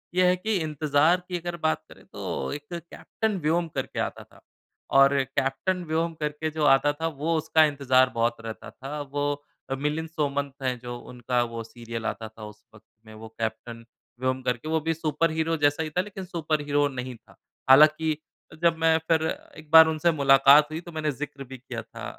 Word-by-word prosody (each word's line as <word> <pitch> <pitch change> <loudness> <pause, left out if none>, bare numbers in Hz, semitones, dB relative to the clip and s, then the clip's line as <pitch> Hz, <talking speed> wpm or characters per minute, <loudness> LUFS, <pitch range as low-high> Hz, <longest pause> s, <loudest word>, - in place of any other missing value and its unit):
ये 185 0 +4
है 180 - +4
कि 215 +4 -2
इंतज़ार 155 +3 +2
की 180 -1 -2
अगर 175 0 -5
बात 155 - +1
करें - - -16
तो 65 - -5
एक 145 0 -7
कैप्टेन 190 +5 -4
व्योम 165 +3 +1
करके - - -3
आता - - -3
था - - -22 0.6
और 135 0 +6
कैप्टेन 135 +7 -1
व्योम 165 +1 -1
करके 150 +1 -2
जो 155 0 -2
आता 145 +1 +4
था 165 - +1
वो 160 +2 -2
उसका 160 +1 +3
इंतज़ार 130 -3 +3
बहुत 115 0 0
रहता 115 -1 -8
था। 145 +3 -7
वो 145 +1 -2 0.4
अ, 135 - -1
मिलिंद 150 +4 -2
सोमन 145 -3 -2
हैं 130 -1 0
जो 120 0 -7
उनका 125 0 -2
वो 115 -1 -5
सीरियल 115 0 -8
आता 110 0 -3
था 110 0 -13
उस 105 0 -13
वक़्त 110 +1 -19 0.2
में 110 - -13
वो 110 +1 -10
कैप्टन 115 +1 -4 0.3
व्योम 130 0 -1
करके। 125 +2 -2
वो 160 0 +2
भी 165 +2 0
सुपरहीरो 160 +1 0
जैसा 145 +1 +2
ही 155 - -4
था 180 +4 0
लेकिन 190 -1 -8
सुपरहीरो 155 -4 -1
वो 145 - +3
नहीं 130 -1 -6
था। 115 - -21 0.3
हालाँकि 155 +3 +6 0.5
जब 165 -1 +4
मैं 160 0 +3
फिर 160 -1 +3 0.3
एक 155 -1 -13
बार 160 0 +10
उनसे 160 +2 +2
मुलाकात 140 0 +6
हुई 155 - -3
तो 175 - -11
मैंने 155 -2 -1
ज़िक्र 140 0 -7
भी 130 0 -10
किया 125 -2 -7
था 85 - -10
145 Hz, 195 wpm, -26 LUFS, 130-160 Hz, 0.6 s, बार